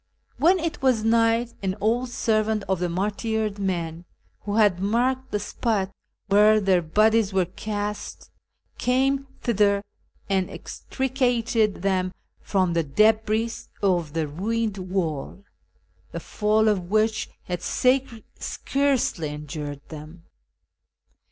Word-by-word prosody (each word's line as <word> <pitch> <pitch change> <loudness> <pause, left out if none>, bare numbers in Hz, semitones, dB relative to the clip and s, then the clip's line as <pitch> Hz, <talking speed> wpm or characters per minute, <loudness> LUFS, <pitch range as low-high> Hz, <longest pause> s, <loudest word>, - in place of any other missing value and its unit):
" - - -46
When 355 +4 +4
it 335 -2 -3
was 255 -5 +2
night 230 +1 +2
an 190 -1 -1
old 235 +5 +1
servant 220 -3 0
of 190 -1 0
the 180 0 -1
martyred 210 +3 -1
men, 170 -3 -3 0.3
who 205 0 -4
had 205 -5 +4
marked 250 +6 0
the 210 - -1
spot 205 -2 -1 0.3
where 210 +2 +5
their 190 -3 +3
bodies 215 +5 +2
were 190 -2 +2
cast, 205 +3 -5 0.5
came 270 +2 +1
thither, 205 -3 +2 0.4
and 190 -2 0
extricated 245 -6 -1
them 185 -1 0 0.2
from 185 -3 0
the 165 -1 +1
cUhris 220 +7 +1 0.2
of 175 -6 +1
the 160 -2 -1
ruined 210 +6 -2
wall, 180 -2 -3 0.7
the - - -3
fall 215 +1 +1
of 185 -5 0
which 215 +1 +1
had 180 -1 -4
scarcely 255 - 0
injured 150 -1 -6
them. 155 +2 -10
210 Hz, 120 wpm, -24 LUFS, 185-230 Hz, 0.7 s, where